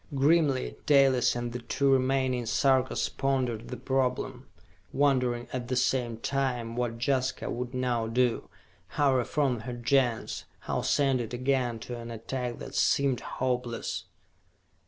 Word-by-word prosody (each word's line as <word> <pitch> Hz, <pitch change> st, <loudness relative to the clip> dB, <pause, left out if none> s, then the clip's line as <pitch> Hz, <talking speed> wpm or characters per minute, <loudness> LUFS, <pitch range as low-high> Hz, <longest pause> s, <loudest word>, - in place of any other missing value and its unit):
Grimly 140 Hz, -1 st, +2 dB
Dalis 135 Hz, -5 st, +4 dB
and 120 Hz, -1 st, -3 dB
the 125 Hz, -, -3 dB
two 140 Hz, +3 st, +1 dB
remaining 130 Hz, -2 st, +1 dB
Sarkas 130 Hz, +2 st, +2 dB
pondered 125 Hz, -4 st, -1 dB
the -, -, -6 dB
problem, 130 Hz, -1 st, -1 dB, 0.4 s
wondering 125 Hz, -4 st, +1 dB
at 125 Hz, -2 st, -3 dB
the 130 Hz, -, -1 dB
same 125 Hz, -2 st, +1 dB
time 125 Hz, -2 st, -2 dB
what 120 Hz, -1 st, -2 dB
Jaska 130 Hz, +1 st, -1 dB
would 125 Hz, +1 st, -4 dB
now 125 Hz, -3 st, 0 dB
do, 120 Hz, +1 st, 0 dB, 0.5 s
how 145 Hz, -2 st, +4 dB
reform 130 Hz, 0 st, +1 dB
her 120 Hz, +3 st, -6 dB
Gens, 120 Hz, -1 st, 0 dB, 0.2 s
how -, -, -2 dB
send 135 Hz, -3 st, +2 dB
it 115 Hz, +1 st, -5 dB
again 125 Hz, -2 st, 0 dB
to 120 Hz, 0 st, -6 dB
an 115 Hz, 0 st, -8 dB
attack 120 Hz, +2 st, -4 dB
that -, -, -8 dB
seemed 135 Hz, -3 st, +2 dB
hopeless. 125 Hz, -2 st, -3 dB
125 Hz, 135 wpm, -28 LUFS, 120-135 Hz, 0.5 s, Dalis